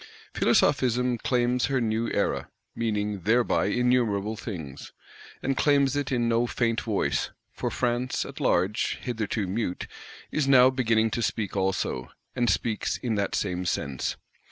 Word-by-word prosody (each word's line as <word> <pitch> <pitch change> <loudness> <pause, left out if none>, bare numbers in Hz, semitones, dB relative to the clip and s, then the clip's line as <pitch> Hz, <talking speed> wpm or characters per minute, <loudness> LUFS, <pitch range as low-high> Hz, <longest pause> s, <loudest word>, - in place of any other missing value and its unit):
Philosophism 125 -3 +2
claims 125 0 +1
her 135 -1 +1
new 115 0 0
Era, - - -1 0.3
meaning 105 -3 -1
thereby 115 +6 +2
innumerable 110 -2 +1
things. 80 - -7 0.5
And 135 +1 0
claims 140 -1 +3
it 145 -2 -1
in 120 -2 +1
no 115 +1 +2
faint 115 -1 0
voice; 95 - 0 0.2
for - - -2
France 125 +1 -1
at - - -9
large, 95 +4 +1
hitherto 110 -3 -2
mute, 95 -1 -2 0.5
is 150 -3 0
now 130 -1 +7
beginning 115 -4 +2
to 120 - -1
speak 105 -3 -2
also; 95 -10 -1 0.3
and 120 -2 +2
speaks 110 +3 0
in 120 -3 -2
that 100 -2 -1
same 90 -2 -1
sense. 70 -6 -2
115 Hz, 140 wpm, -27 LUFS, 105-125 Hz, 0.5 s, now